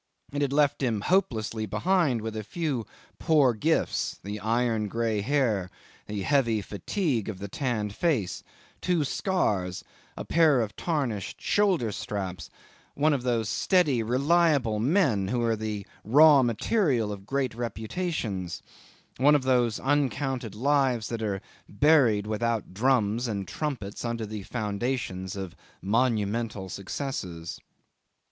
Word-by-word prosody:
It 145 Hz, -, -1 dB
had 140 Hz, -2 st, +1 dB
left 145 Hz, 0 st, +2 dB
him 115 Hz, -6 st, 0 dB
hopelessly 115 Hz, -, 0 dB
behind 160 Hz, -, +1 dB
with 110 Hz, -1 st, -4 dB
a 110 Hz, -, -3 dB
few 135 Hz, -, -3 dB, 0.3 s
poor 150 Hz, -7 st, +4 dB
gifts: 155 Hz, +9 st, 0 dB
the 105 Hz, +1 st, -5 dB
iron 115 Hz, 0 st, 0 dB
grey 110 Hz, 0 st, -1 dB
hair, 110 Hz, -7 st, +1 dB, 0.4 s
the 105 Hz, -2 st, -3 dB
heavy 115 Hz, -6 st, +2 dB
fatigue 120 Hz, -, -2 dB
of 105 Hz, -, -5 dB
the 100 Hz, +2 st, -6 dB
tanned 110 Hz, -3 st, -2 dB
face, 130 Hz, -, 0 dB, 0.4 s
two 175 Hz, -4 st, +1 dB
scars, 105 Hz, -, -1 dB, 0.3 s
a -, -, -5 dB
pair 160 Hz, -5 st, +4 dB
of 105 Hz, -2 st, -4 dB
tarnished 135 Hz, -, -2 dB
shoulder 185 Hz, -, +2 dB
straps; 95 Hz, -2 st, -5 dB, 0.5 s
one 150 Hz, +2 st, +3 dB
of 135 Hz, -, 0 dB
those 120 Hz, -3 st, 0 dB
steady, 145 Hz, -, +2 dB
reliable 135 Hz, -1 st, +2 dB
men 130 Hz, -, +2 dB
who 120 Hz, +2 st, 0 dB
are 115 Hz, -1 st, +2 dB
the 105 Hz, -2 st, -4 dB, 0.2 s
raw 145 Hz, +5 st, +7 dB
material 120 Hz, -, +1 dB
of 100 Hz, -1 st, -8 dB
great 135 Hz, -1 st, -1 dB
reputations, 110 Hz, -, -3 dB, 0.5 s
one 145 Hz, +4 st, +5 dB
of 145 Hz, -, +1 dB
those 125 Hz, -4 st, +2 dB
uncounted 135 Hz, -4 st, -1 dB
lives 130 Hz, -2 st, +1 dB
that 115 Hz, -1 st, -3 dB
are 100 Hz, -2 st, -2 dB, 0.3 s
buried 120 Hz, -4 st, +4 dB
without 110 Hz, -1 st, -2 dB
drums 120 Hz, 0 st, +1 dB
and 100 Hz, -4 st, -3 dB
trumpets 125 Hz, -10 st, -4 dB
under 115 Hz, -2 st, -2 dB
the 105 Hz, 0 st, -6 dB
foundations 105 Hz, -3 st, -3 dB
of 95 Hz, -3 st, -6 dB, 0.2 s
monumental 110 Hz, -1 st, 0 dB
successes. 90 Hz, -, -5 dB
115 Hz, 130 wpm, -27 LUFS, 105-140 Hz, 0.5 s, raw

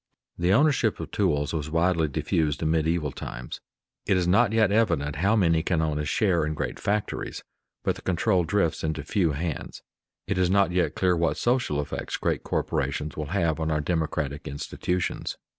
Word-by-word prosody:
_ -, -, -7 dB
The 90 Hz, +1 st, +3 dB
ownership 135 Hz, -2 st, +3 dB
of -, -, -6 dB
tools 75 Hz, -8 st, 0 dB
was 80 Hz, -2 st, -2 dB
widely 85 Hz, 0 st, +2 dB
diffused 75 Hz, +2 st, -1 dB
in 80 Hz, -, +1 dB
medieval 80 Hz, -2 st, +1 dB
times. -, -, -7 dB, 0.5 s
It 95 Hz, -, +3 dB
is 90 Hz, -1 st, +1 dB
not 100 Hz, +3 st, +4 dB
yet 110 Hz, -3 st, +3 dB
evident 75 Hz, -10 st, +1 dB
how 100 Hz, +8 st, +3 dB
many 85 Hz, -6 st, +3 dB
can 85 Hz, 0 st, 0 dB
own 80 Hz, -2 st, 0 dB
a 75 Hz, -, -2 dB
share 90 Hz, 0 st, +2 dB
in 75 Hz, 0 st, -2 dB
great -, -, -3 dB
factories, 105 Hz, 0 st, -2 dB, 0.4 s
but -, -, 0 dB
the -, -, -11 dB
control 95 Hz, +1 st, +1 dB
drifts 85 Hz, -1 st, 0 dB
into 80 Hz, -2 st, -2 dB
few 85 Hz, -2 st, +1 dB
hands. 80 Hz, +1 st, -4 dB, 0.4 s
It 100 Hz, -, -1 dB
is 90 Hz, -1 st, +3 dB
not 100 Hz, -1 st, +3 dB
yet 90 Hz, -1 st, +1 dB
clear 90 Hz, -1 st, +2 dB
what 85 Hz, 0 st, +1 dB
social 120 Hz, -, +1 dB
effects 75 Hz, -, -4 dB
great -, -, -1 dB
corporations 70 Hz, +3 st, -2 dB
will 75 Hz, -1 st, -4 dB
have 85 Hz, -2 st, 0 dB
on 80 Hz, 0 st, -1 dB
our 75 Hz, -1 st, +1 dB
democratic 75 Hz, -3 st, -2 dB
institutions. 90 Hz, +5 st, -3 dB
85 Hz, 185 wpm, -26 LUFS, 75-95 Hz, 0.5 s, not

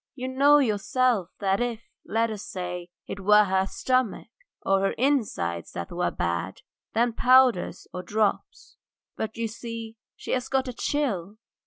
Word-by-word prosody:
"You 255 Hz, -1 st, -4 dB
know 280 Hz, +3 st, +5 dB
yourself 235 Hz, -4 st, +1 dB
that 195 Hz, 0 st, +1 dB
if, 235 Hz, -2 st, -2 dB, 0.2 s
let 225 Hz, +1 st, 0 dB
us 215 Hz, -1 st, -6 dB
say, 180 Hz, -2 st, -5 dB, 0.2 s
it -, -, -6 dB
were 210 Hz, +2 st, +6 dB
her 190 Hz, -1 st, +1 dB
stomach 255 Hz, 0 st, -1 dB, 0.3 s
or 195 Hz, 0 st, +3 dB
her 195 Hz, 0 st, +1 dB
inside 215 Hz, -, 0 dB
that 85 Hz, -, -5 dB
were 175 Hz, +1 st, 0 dB
bad, 85 Hz, +2 st, -3 dB, 0.3 s
then 235 Hz, +1 st, +2 dB
powders 250 Hz, -4 st, +4 dB
or 180 Hz, -, -4 dB
drops, 210 Hz, +3 st, -2 dB, 0.4 s
but 220 Hz, 0 st, -4 dB
you 230 Hz, 0 st, -1 dB
see 225 Hz, 0 st, -7 dB, 0.2 s
she -, -, -7 dB
had 255 Hz, 0 st, -1 dB
got 265 Hz, 0 st, +1 dB
a 250 Hz, -, -4 dB
chill! 220 Hz, -, -2 dB
220 Hz, 155 wpm, -26 LUFS, 190-250 Hz, 0.4 s, were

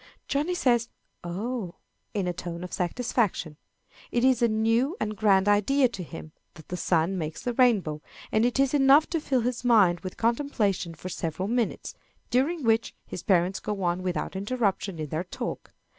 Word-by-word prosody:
Johnny 300 Hz, +6 st, 0 dB
says 240 Hz, -7 st, +2 dB, 0.3 s
"Oh!" 195 Hz, +2 st, -4 dB, 0.4 s
in 200 Hz, -3 st, 0 dB
a 180 Hz, -, -1 dB
tone 175 Hz, 0 st, -6 dB
of 180 Hz, -, -7 dB
satisfaction. 180 Hz, -, -1 dB, 0.5 s
It 240 Hz, -, 0 dB
is 260 Hz, -2 st, +4 dB
a 235 Hz, -, +5 dB
new 225 Hz, -, +1 dB
and 215 Hz, 0 st, -2 dB
grand 195 Hz, -1 st, +3 dB
idea 250 Hz, +7 st, +4 dB
to 195 Hz, -5 st, -7 dB
him 165 Hz, -2 st, -9 dB, 0.2 s
that 160 Hz, -, -14 dB
the 180 Hz, -, -3 dB
sun 175 Hz, +1 st, +1 dB
makes 155 Hz, -1 st, -5 dB
the 245 Hz, -, -1 dB
rainbow, 210 Hz, -, +2 dB, 0.3 s
and 215 Hz, -, +3 dB
it 245 Hz, +2 st, +1 dB
is 275 Hz, 0 st, +3 dB
enough 280 Hz, +2 st, +6 dB
to 330 Hz, -2 st, 0 dB
fill 265 Hz, -4 st, +1 dB
his 245 Hz, +1 st, -2 dB
mind 205 Hz, -8 st, +5 dB
with 185 Hz, +1 st, -7 dB
contemplation 225 Hz, -, 0 dB
for 180 Hz, +3 st, -7 dB
several 170 Hz, +2 st, -3 dB
minutes, 235 Hz, 0 st, -1 dB, 0.4 s
during 290 Hz, +5 st, +1 dB
which 225 Hz, 0 st, +1 dB
his 180 Hz, -, -7 dB
parents 185 Hz, 0 st, +2 dB
go 205 Hz, -2 st, -4 dB
on 175 Hz, +1 st, 0 dB
without 185 Hz, +1 st, -3 dB
interruption 200 Hz, -3 st, -1 dB
in 155 Hz, -2 st, -5 dB
their 155 Hz, +4 st, -2 dB
talk. -, -, -6 dB
210 Hz, 175 wpm, -27 LUFS, 180-245 Hz, 0.5 s, enough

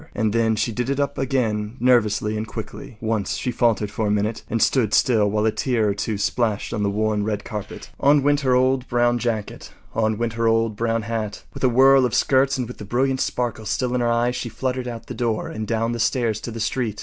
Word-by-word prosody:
And 110 Hz, -1 st, 0 dB
then 115 Hz, -1 st, +2 dB
she 110 Hz, +2 st, -1 dB
did 125 Hz, +3 st, -3 dB
it 140 Hz, 0 st, -1 dB
up 140 Hz, -, -1 dB
again 115 Hz, -4 st, -1 dB
nervously 110 Hz, -4 st, +2 dB
and 110 Hz, +1 st, -3 dB
quickly. 110 Hz, +1 st, -8 dB
Once 110 Hz, -4 st, -1 dB
she 125 Hz, -, -2 dB
faltered 115 Hz, -4 st, +1 dB
for 110 Hz, 0 st, -1 dB
a -, -, 0 dB
minute 105 Hz, +2 st, 0 dB
and 115 Hz, -, 0 dB
stood 110 Hz, -1 st, +2 dB
still 110 Hz, -5 st, +3 dB
while 105 Hz, +1 st, 0 dB
a 110 Hz, -, +3 dB
tear 115 Hz, -3 st, 0 dB
or -, -, +1 dB
two 100 Hz, +1 st, -3 dB
splashed 110 Hz, 0 st, -1 dB
on 105 Hz, -, -2 dB
the 100 Hz, -, +1 dB
worn 105 Hz, 0 st, 0 dB
red 105 Hz, -1 st, -2 dB
carpet. 105 Hz, -4 st, -7 dB
On 145 Hz, 0 st, +4 dB
went 145 Hz, 0 st, +3 dB
her 130 Hz, -3 st, +2 dB
old 130 Hz, 0 st, +2 dB
brown 120 Hz, 0 st, +2 dB
jacket; 110 Hz, -3 st, -3 dB, 0.2 s
on 110 Hz, -1 st, 0 dB
went 115 Hz, 0 st, -2 dB
her 115 Hz, 0 st, 0 dB
old 115 Hz, -1 st, +2 dB
brown 115 Hz, 0 st, -1 dB
hat. 110 Hz, -1 st, -4 dB
With -, -, -9 dB
a 130 Hz, -, +5 dB
whirl 135 Hz, +2 st, +6 dB
of 125 Hz, -, 0 dB
skirts 135 Hz, 0 st, +3 dB
and 125 Hz, -2 st, -2 dB
with 125 Hz, -, -10 dB
the -, -, -6 dB
brilliant 130 Hz, +5 st, 0 dB
sparkle 120 Hz, -3 st, -2 dB
still 125 Hz, -1 st, -1 dB
in 125 Hz, -, 0 dB
her 120 Hz, -, +1 dB
eyes, 120 Hz, +1 st, +1 dB
she 120 Hz, -, -4 dB
fluttered 125 Hz, +2 st, -3 dB
out 115 Hz, -2 st, -6 dB
the -, -, -7 dB
door 115 Hz, -2 st, -2 dB
and 110 Hz, -1 st, -5 dB
down 115 Hz, 0 st, 0 dB
the 120 Hz, -, -3 dB
stairs 115 Hz, -2 st, 0 dB
to -, -, -5 dB
the 115 Hz, 0 st, -6 dB
street. 110 Hz, -2 st, -2 dB
115 Hz, 240 wpm, -22 LUFS, 110-125 Hz, 0.2 s, whirl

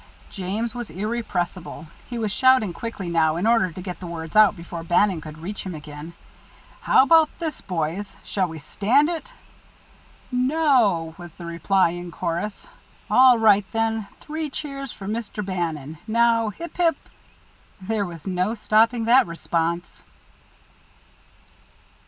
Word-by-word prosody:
James 210 Hz, +4 st, -3 dB
was 240 Hz, -2 st, -6 dB
irrepressible. 190 Hz, -5 st, -3 dB, 0.2 s
He 240 Hz, -, -4 dB
was 220 Hz, -3 st, -1 dB
shouting 260 Hz, -5 st, +4 dB
quickly 215 Hz, -1 st, -6 dB
now, 160 Hz, -2 st, +2 dB
in 175 Hz, +5 st, -1 dB
order 225 Hz, -5 st, +3 dB
to 185 Hz, -, -8 dB
get 180 Hz, -2 st, -6 dB
the 180 Hz, -, -7 dB
words 165 Hz, 0 st, -7 dB
out 215 Hz, -1 st, +6 dB
before 170 Hz, -1 st, -7 dB
Bannon 175 Hz, +1 st, +2 dB
could 155 Hz, 0 st, -9 dB
reach 190 Hz, +6 st, -6 dB
him 185 Hz, -3 st, -5 dB
again. 150 Hz, +2 st, -9 dB, 0.7 s
"How -, -, +5 dB
about 320 Hz, +2 st, +5 dB
this, 325 Hz, -3 st, -4 dB
boys? 180 Hz, +3 st, -3 dB
Shall 190 Hz, -2 st, -1 dB
we 160 Hz, -1 st, -8 dB
stand 225 Hz, -, +2 dB
it?" 345 Hz, +8 st, -5 dB, 1.0 s
"No!" 250 Hz, -, +2 dB
was 175 Hz, -2 st, -10 dB
the 170 Hz, -, -9 dB
reply 170 Hz, +2 st, +2 dB
in 175 Hz, 0 st, -6 dB
chorus. 175 Hz, -, -4 dB, 0.4 s
"All 255 Hz, -1 st, +7 dB
right, 210 Hz, -3 st, +5 dB
then. 225 Hz, -2 st, 0 dB
Three 310 Hz, 0 st, -4 dB
cheers 275 Hz, -2 st, -5 dB
for 195 Hz, -, -10 dB
Mr. 210 Hz, -1 st, -4 dB
Bannon. 160 Hz, -5 st, -3 dB
Now 230 Hz, 0 st, +3 dB
Hip, 335 Hz, -, -9 dB
hip 340 Hz, -2 st, +3 dB, 0.5 s
" -, -, -33 dB
There 215 Hz, -3 st, 0 dB
was 170 Hz, -3 st, -10 dB
no 185 Hz, +3 st, 0 dB
stopping 225 Hz, +2 st, +2 dB
that 245 Hz, +1 st, +5 dB
response. 170 Hz, 0 st, -3 dB
200 Hz, 145 wpm, -23 LUFS, 170-235 Hz, 1.0 s, All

